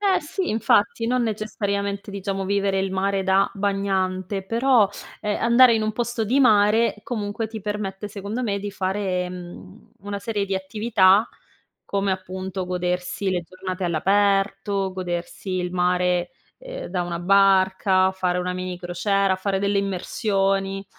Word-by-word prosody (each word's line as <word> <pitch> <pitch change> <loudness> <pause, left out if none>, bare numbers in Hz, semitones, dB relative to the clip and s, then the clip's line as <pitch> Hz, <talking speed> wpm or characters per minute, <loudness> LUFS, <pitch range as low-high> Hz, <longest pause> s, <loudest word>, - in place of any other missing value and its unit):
Eh, 395 -2 +2
sì, 350 +5 -3
infatti. 215 +1 +2
Non 250 +1 +1
necessariamente, 200 -2 -2
diciamo, 195 -1 -3
vivere 195 0 0
il 190 0 -1
mare 195 +1 0
da 190 +1 +3
bagnante, 195 -1 -1
però, 230 0 +3 0.3
ehm, 210 0 -1
andare 235 +1 +6
in 220 - 0
un 215 0 -1
posto 235 0 -2
di 245 +6 +1
mare, 220 -2 +4
comunque, 220 -1 -3
ti 220 0 -7
permette, 205 -1 -4
secondo 205 +4 -5
me, 205 -4 -1
di 205 +1 -4
fare, 185 -2 -2
mhmm, 180 +3 -11
una 200 0 -5
serie 210 -2 -2
di 195 - -2
attività 200 +1 +3 0.6
come, 200 -1 0
appunto, 185 0 -4
godersi 180 +2 -2
le 180 -2 0
giornate 185 +2 -6
all'aperto, 195 +2 +1
godersi 180 +1 -5
il 180 0 -3
mare, 180 0 +1 0.3
ehm, - - -7
da 180 0 -1
una 170 -1 -4
barca, 190 0 +4
fare 185 -1 -1
una 180 0 -1
mini 185 0 -4
crociera, 190 +2 0
fare 195 0 -1
delle 200 0 +1
immersioni. 195 0 -1
195 Hz, 145 wpm, -23 LUFS, 185-210 Hz, 0.6 s, andare